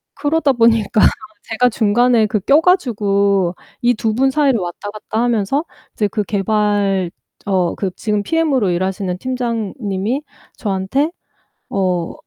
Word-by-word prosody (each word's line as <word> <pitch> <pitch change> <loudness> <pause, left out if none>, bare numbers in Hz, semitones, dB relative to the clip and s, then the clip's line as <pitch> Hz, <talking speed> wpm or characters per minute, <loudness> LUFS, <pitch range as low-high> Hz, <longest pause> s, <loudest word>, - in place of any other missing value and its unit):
그러다 295 -1 +1
보니까 230 -3 +3 0.5
제가 240 +2 +2
중간에 230 +1 +3
그 210 0 0
껴 280 - +4
가지고 200 - +2 0.3
이 240 0 +3
2 220 0 -1
분 265 +3 +3
사이를 275 -4 +2
왔다 180 +3 -5
갔다 215 +1 -4
하면서 240 +5 0 0.3
이제 210 - 0
그 210 +1 -2
개발 200 -2 0 0.3
어 185 -3 +1
그 195 - -2
지금 210 -2 -1
PM으로 285 - +1
일하시는 185 +1 -2
팀장님이 230 -1 -2 0.4
저한테 205 - -1 0.6
어 180 -3 -1
215 Hz, 260 characters per minute, -18 LUFS, 195-250 Hz, 0.6 s, 껴